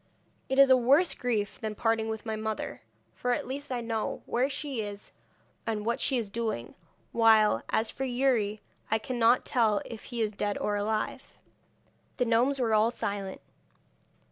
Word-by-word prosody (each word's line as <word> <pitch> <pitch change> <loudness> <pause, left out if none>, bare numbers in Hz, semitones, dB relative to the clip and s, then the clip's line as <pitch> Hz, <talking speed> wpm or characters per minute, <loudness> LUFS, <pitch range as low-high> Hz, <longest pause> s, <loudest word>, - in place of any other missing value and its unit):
It 265 - 0
is 275 -1 +7
a - - +9
worse 275 +8 +4
grief 220 -5 -2
than 215 -1 -3
parting 225 0 +1
with 220 0 -5
my 220 -1 -2
mother, 215 0 -4 0.3
for 245 0 -1
at - - -2
least 280 +2 -6
I 245 -1 -1
know 225 -2 -3
where 255 +3 +1
she 280 -4 -3
is 205 -1 -7 0.6
and 215 -2 -2
what 235 +1 0
she 265 - +3
is 230 -3 -2
doing; 215 - -3 0.4
while, 220 - +5
as 220 0 +1
for 270 - -5
Youri, 245 -5 +1 0.3
I 220 - +3
cannot 240 +1 +2
tell 220 -5 +2
if 230 -2 -9
he 240 -2 -5
is 215 - -1
dead 205 0 -2
or 205 - -1
alive.' 215 +1 -3 0.8
The 250 - +2
gnomes 240 +4 +2
were 235 -4 +1
all 215 +1 +4
silent. 200 -4 -4
225 Hz, 170 wpm, -29 LUFS, 215-250 Hz, 0.8 s, a